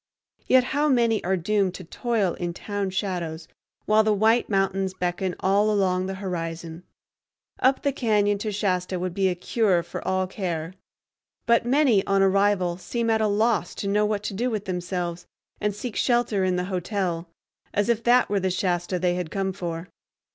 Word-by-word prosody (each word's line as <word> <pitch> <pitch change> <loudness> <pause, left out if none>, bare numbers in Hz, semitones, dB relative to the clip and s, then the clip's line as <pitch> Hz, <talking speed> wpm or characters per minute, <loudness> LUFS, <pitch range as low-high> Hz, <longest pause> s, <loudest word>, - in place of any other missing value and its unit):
Yet 255 -1 +5
how 295 +2 +2
many 235 -4 +2
are 190 +1 +1
doomed 195 +1 0
to 185 - -8
toil 210 0 -1
in 175 -1 -4
town 205 -1 -3
shadows 175 -4 -3 0.4
while 215 +1 +4
the 215 - +2
white 220 +4 +3
mountains 195 -1 0
beckon 180 0 -2
all 200 +3 +3
along 185 -3 +1
the 190 - -4
horizon! 165 -3 -5 0.8
Up 265 +1 +2
the 280 -1 +1
cañon 205 -5 +1
to 215 +1 -3
Shasta 185 -3 -1
would 180 0 -3
be 190 0 +2
a 180 - -1
cure 185 -1 +1
for 170 - -7
all 185 0 +1
care. 180 -3 -4 0.7
But 235 0 +3
many 255 -7 +4
on 195 0 +3
arrival 195 -2 +2
seem 230 +4 -1
at 220 0 +2
a 215 - +3
loss 210 -4 +1
to 200 - -4
know 210 +1 +2
what 210 -1 -2
to 205 - -3
do 240 +6 -1
with 215 -3 -3
themselves, 180 -2 -3 0.3
and 210 -1 -1
seek 230 +1 -6
shelter 240 -5 +1
in 185 -1 +1
the 180 0 -1
hotel, 180 -2 -2 0.4
as 205 0 0
if 235 -2 +1
that 245 +2 +4
were 200 -1 0
the 190 0 0
Shasta 180 0 -1
they 180 0 +1
had 180 -2 -3
come 190 +2 -2
for. 170 -2 -5
195 Hz, 185 wpm, -25 LUFS, 180-215 Hz, 0.8 s, Yet